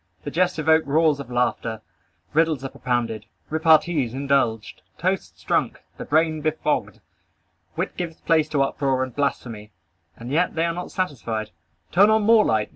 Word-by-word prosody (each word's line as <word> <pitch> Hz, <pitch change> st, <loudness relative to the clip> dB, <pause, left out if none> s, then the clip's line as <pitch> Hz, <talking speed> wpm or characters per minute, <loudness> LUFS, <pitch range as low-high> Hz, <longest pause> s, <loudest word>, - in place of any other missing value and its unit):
The 145 Hz, -, -5 dB
jests 180 Hz, +2 st, +1 dB
evoke 160 Hz, +1 st, +4 dB
roars 155 Hz, 0 st, +3 dB
of 140 Hz, -3 st, -8 dB
laughter. 115 Hz, -2 st, -1 dB, 0.5 s
Riddles 160 Hz, -3 st, +2 dB
are -, -, -3 dB
propounded. 115 Hz, -4 st, -2 dB, 0.2 s
Repartees 160 Hz, -5 st, +3 dB
indulged. 135 Hz, -6 st, 0 dB, 0.2 s
Toasts -, -, -3 dB
drunk. -, -, -1 dB
The -, -, -7 dB
brain 155 Hz, 0 st, +1 dB
befogged. 155 Hz, +1 st, -1 dB, 0.7 s
Wit -, -, -3 dB
gives 170 Hz, -3 st, -5 dB
place 160 Hz, -2 st, +2 dB
to 140 Hz, -3 st, +2 dB
uproar 135 Hz, -1 st, 0 dB
and 130 Hz, -2 st, -7 dB
blasphemy. 115 Hz, -7 st, -3 dB, 0.5 s
And 120 Hz, +2 st, -8 dB
yet 170 Hz, +4 st, +1 dB
they 165 Hz, +1 st, +1 dB
are 170 Hz, -, -1 dB
not 180 Hz, +1 st, -6 dB
satisfied. 115 Hz, -, -3 dB, 0.4 s
Turn 200 Hz, +4 st, +5 dB
on 220 Hz, 0 st, +3 dB
more 220 Hz, 0 st, +6 dB
light. 110 Hz, -, 0 dB
145 Hz, 155 wpm, -23 LUFS, 120-165 Hz, 0.7 s, more